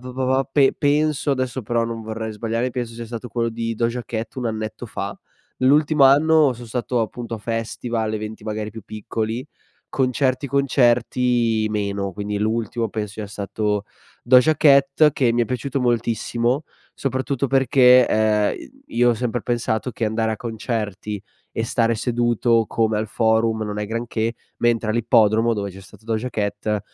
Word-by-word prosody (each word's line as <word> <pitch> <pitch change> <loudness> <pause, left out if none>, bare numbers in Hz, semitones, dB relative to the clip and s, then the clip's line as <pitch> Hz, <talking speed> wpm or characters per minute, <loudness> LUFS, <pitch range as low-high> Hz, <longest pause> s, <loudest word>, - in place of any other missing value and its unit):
pa 125 0 -8
pa 130 +1 +1
pe 140 -2 +4
penso, 150 0 +1
adesso 130 -1 -1
però 115 +2 0
non 115 -1 -5
vorrei 110 0 -5
sbagliare, 115 +3 -2
penso 120 -2 -4
sia 115 0 -7
stato 120 +1 -7
quello 115 +1 -1
di 115 0 -3
Doja 120 +2 -1
Cat 110 -1 -5
un 125 - -3
annetto 110 -1 -4
fa. - - -5 0.4
L'ultimo 145 +1 +4
anno 150 +1 +5
son 120 0 -10
stato 120 +1 -1
appunto 115 +1 -5
a - - -6
festival, 115 0 -3
eventi 110 0 -6
magari 110 -1 -4
più 110 +1 -9
piccoli. 110 +4 -4 0.4
Concerti 130 +1 0
concerti 120 -4 +2
meno, 100 -2 -2
quindi 105 +1 -3
l'ultimo 115 +2 -1
penso 105 -2 -4
sia 110 -1 -5
stato 105 +1 -2 0.4
Doja 130 +5 +5
Cat 140 +1 +5
che 125 -4 +2
mi 120 - +3
è - - +1
piaciuto 130 +3 -3
moltissimo, 120 +3 0 0.3
soprattutto 135 0 -1
perché, 130 -2 +5
ehm, 110 -1 +2
i - - -11 0.3
io 120 0 +5
ho - - +1
sempre 120 +1 -2
pensato 120 0 -1
che 115 -1 -2
andare 110 +1 0
a 110 - -3
concerti 110 -3 -4 0.3
e 115 - -2
stare 115 0 +1
seduto 120 -1 +1
come 110 -1 +1
al 110 0 -2
forum 110 0 +1
non 105 -1 -4
è 105 - -2
granché, 115 0 -2 0.3
mentre 115 -2 +1
all'ippodromo 115 0 +3
dove 100 -2 -3
c'è 95 +1 -12
stato 105 +2 -17
Doja 115 +2 -2
Cat 105 0 -2
115 Hz, 165 wpm, -22 LUFS, 110-125 Hz, 0.4 s, anno